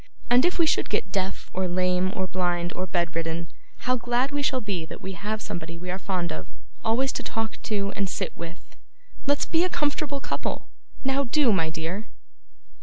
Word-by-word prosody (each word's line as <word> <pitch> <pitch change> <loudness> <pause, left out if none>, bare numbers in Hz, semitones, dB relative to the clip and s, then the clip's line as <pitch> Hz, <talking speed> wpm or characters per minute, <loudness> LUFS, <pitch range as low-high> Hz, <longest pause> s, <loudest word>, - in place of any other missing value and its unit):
And 250 +5 +7
if 355 - +2
we 335 - +6
should 315 - +2
get - - 0
deaf, 190 -1 -2
or 185 0 +1
lame, 185 +1 +2
or 190 - +1
blind, 175 -1 0
or 185 - -1
bed 170 -2 0
ridden, 165 0 -1 0.4
how 255 0 +3
glad 245 +3 +1
we 290 0 0
shall 265 -2 +2
be 200 -7 -2
that 160 - -7
we 190 - -4
have 210 +4 -3
somebody 165 0 -4
we 180 +1 -4
are 185 - -2
fond 180 -4 -1
of, 80 0 -5 0.4
always 255 +4 +3
to - - -3
talk 225 -1 -2
to 200 -2 0
and 195 -2 0
sit - - -2
with! 170 +1 -8 0.5
Let's 285 0 +4
be 330 +1 +3
a 365 - +2
comfortable 290 -2 0
couple. - - -3 0.4
Now, 270 +1 +3
do, 255 -2 +4
my 165 -4 +2
dear! 165 +6 -3
190 Hz, 195 wpm, -27 LUFS, 175-255 Hz, 0.5 s, And